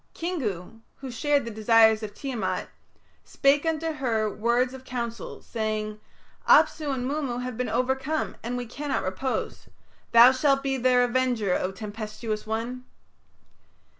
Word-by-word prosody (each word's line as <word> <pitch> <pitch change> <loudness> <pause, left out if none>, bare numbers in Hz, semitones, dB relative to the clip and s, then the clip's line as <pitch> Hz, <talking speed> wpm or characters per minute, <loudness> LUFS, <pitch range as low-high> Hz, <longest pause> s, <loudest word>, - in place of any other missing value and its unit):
Kingu, 225 - -4
who 265 -2 -8
shared 285 +3 +1
the 230 - -5
desires 220 0 +4
of 210 -1 -7
Tiamat, 215 -10 -3 0.5
spake 285 +3 +2
unto 320 0 -1
her 235 -7 0
words 235 +4 0
of 265 0 -10
counsel, 235 -3 -5
saying, 215 -1 -3 0.5
"Apsu 305 -2 +5
and 255 -2 -2
Mummu 270 -4 -2
have 250 -2 -4
been 250 +2 -2
overcome 265 +4 -1
and 245 +2 -3
we 245 - -4
cannot 275 +4 -3
repose. 225 +8 -3 0.4
Thou 235 +2 +9
shalt 275 +1 +2
be 270 -1 0
their 250 0 +4
Avenger, 245 -5 +1
O 185 - -1
Tempestuous 215 +1 -5
One." 235 +3 -3
245 Hz, 135 wpm, -26 LUFS, 220-265 Hz, 0.5 s, Thou